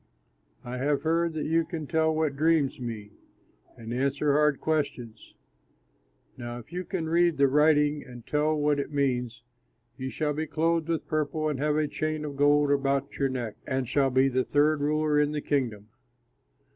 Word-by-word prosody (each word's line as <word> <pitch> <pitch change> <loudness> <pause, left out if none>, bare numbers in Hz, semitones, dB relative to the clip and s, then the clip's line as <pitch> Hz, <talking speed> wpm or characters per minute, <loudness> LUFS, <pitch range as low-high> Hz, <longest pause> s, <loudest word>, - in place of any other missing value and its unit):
I 125 +1 -5
have 140 +1 0
heard 165 +1 +1
that 155 -1 -3
you 165 +1 +2
can 160 -2 -6
tell 160 +1 +1
what 155 -3 0
dreams 155 -2 +2
mean 110 -4 -6 0.7
and 115 0 -7
answer 140 +3 +1
hard 150 -1 +3
questions. 130 -8 -3 1.0
Now 120 -1 -6
if 120 +7 -12
you 180 +1 -3
can 170 -5 -3
read 170 0 +2
the 140 0 +5
writing 150 +1 +3
and 120 -2 -12
tell 150 +1 +1
what 150 -1 +1
it 140 - -4
means, 125 -5 -1 0.6
you 130 0 -3
shall 150 +1 -1
be 155 +2 -3
clothed 165 +2 0
with 165 -1 -1
purple 155 0 -1
and 145 -4 -3
have 150 +1 +1
a 155 0 +1
chain 155 +1 -3
of 145 -1 -6
gold 145 0 +3
about 140 -1 0
your 135 -1 +2
neck 120 -4 -4
and 130 -2 -1
shall 135 +2 +2
be 130 +1 +3
the 130 -1 +1
third 150 +2 +2
ruler 150 0 +1
in 150 0 +1
the 150 - -1
kingdom." 115 -9 -2
145 Hz, 180 wpm, -27 LUFS, 130-155 Hz, 1.0 s, the